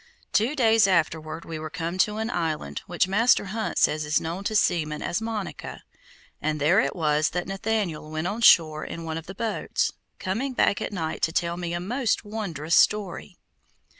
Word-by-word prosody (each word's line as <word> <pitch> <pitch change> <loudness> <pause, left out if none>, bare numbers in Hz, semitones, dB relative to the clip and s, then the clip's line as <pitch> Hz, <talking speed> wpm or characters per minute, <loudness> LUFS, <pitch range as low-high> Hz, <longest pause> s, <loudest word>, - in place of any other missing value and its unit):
Two 230 +7 +2
days 225 -5 +4
afterward 160 -3 0
we 160 -1 -6
were 155 0 -5
come 170 +2 -4
to 210 +2 +2
an 220 +2 -2
island 155 - -2
which 175 +1 +1
Master 220 +4 +3
Hunt 225 -1 -3
says 155 0 +3
is 150 +1 +2
known 170 +4 -4
to 215 - -1
seamen 155 -7 +1
as 190 - -1
Monica, 225 -3 -5 0.6
and 155 0 -1
there 165 +8 +4
it - - 0
was 155 -2 +2
that 175 0 -3
Nathaniel 195 -6 -2
went 155 +1 -3
on 210 +5 -2
shore 155 -7 +6
in 165 - -6
one 160 0 -3
of 165 - -14
the 190 - -8
boats, 225 +2 -1 0.3
coming 225 +8 -2
back 200 - +2
at - - -3
night 165 -5 -3
to 160 - +2
tell 170 +1 0
me 175 -1 -4
a - - -2
most 230 +6 -1
wondrous 175 -7 -2
story. 195 - +1
175 Hz, 190 wpm, -25 LUFS, 160-210 Hz, 0.6 s, shore